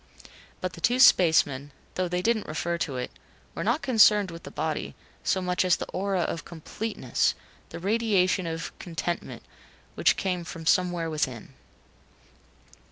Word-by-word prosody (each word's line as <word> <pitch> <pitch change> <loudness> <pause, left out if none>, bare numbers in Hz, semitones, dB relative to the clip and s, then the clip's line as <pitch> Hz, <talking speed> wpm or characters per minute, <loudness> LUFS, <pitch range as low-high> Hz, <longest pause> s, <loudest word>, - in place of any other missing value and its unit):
But 185 -1 -3
the 170 - -11
two 245 +7 +2
spacemen, 160 - +5 0.2
though 185 0 -1
they 180 +1 -2
didn't 225 0 +1
refer 170 +2 -2
to 140 -6 -2
it 125 - -4 0.4
were - - -4
not 235 +9 0
concerned 210 -6 +5
with 165 0 -9
the - - -9
body - - -3 0.3
so 190 - 0
much 180 0 +1
as 180 -2 +4
the - - -5
aura 195 -1 -1
of 165 0 -2
completeness, 170 - -2 0.3
the - - -7
radiation 195 -2 +1
of 165 0 -5
contentment 175 0 -4 0.5
which - - +3
came 180 -2 -1
from 165 0 -8
somewhere 175 -1 +2
within. 150 -7 -3
180 Hz, 150 wpm, -27 LUFS, 165-195 Hz, 0.5 s, spacemen